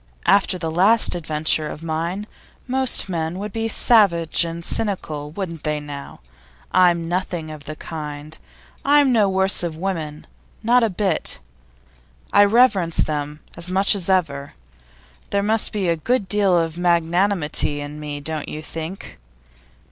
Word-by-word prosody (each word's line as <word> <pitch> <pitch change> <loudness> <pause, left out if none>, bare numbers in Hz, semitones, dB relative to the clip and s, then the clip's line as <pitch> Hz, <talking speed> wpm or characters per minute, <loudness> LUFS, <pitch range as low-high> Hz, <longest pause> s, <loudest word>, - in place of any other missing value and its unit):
After 195 -2 +3
that 165 - -4
last 200 +7 +3
adventure 155 -2 0
of 150 - -8
mine 165 +5 -3 0.4
most 260 -3 +2
men 165 -1 -3
would 205 +1 -6
be 225 0 -1
savage 195 -9 +4
and 170 0 -5
cynical, 155 -9 -2
wouldn't 165 -2 -6
they, 150 -1 -1
now? 145 - -9 0.5
I'm 175 -2 +3
nothing 175 -2 -3
of 150 -2 -10
the 155 - -6
kind. 150 -1 -7 0.5
I 290 +1 +5
think 265 -3 +2
no 210 -4 +3
worse 190 +1 +1
of 170 -3 -4
women 160 -5 -4 0.4
not 245 +3 +4
a 225 - +2
bit. 195 +1 -1 1.0
I 205 - +7
reverence 200 -6 +3
them 150 0 -1
as 170 +2 -5
much 195 +3 +4
as 195 -3 -3
ever. 145 -7 0 0.7
There 200 0 0
must 220 +1 +2
be 200 -4 -1
a 170 - +2
good 225 +4 0
deal 200 -3 +2
of 165 0 -1
magnanimity 170 -3 +1
in 145 +1 -7
me, 145 -1 -6
don't 155 +1 -4
you 155 - -6
think? 165 - -8
170 Hz, 150 wpm, -21 LUFS, 155-200 Hz, 1.0 s, I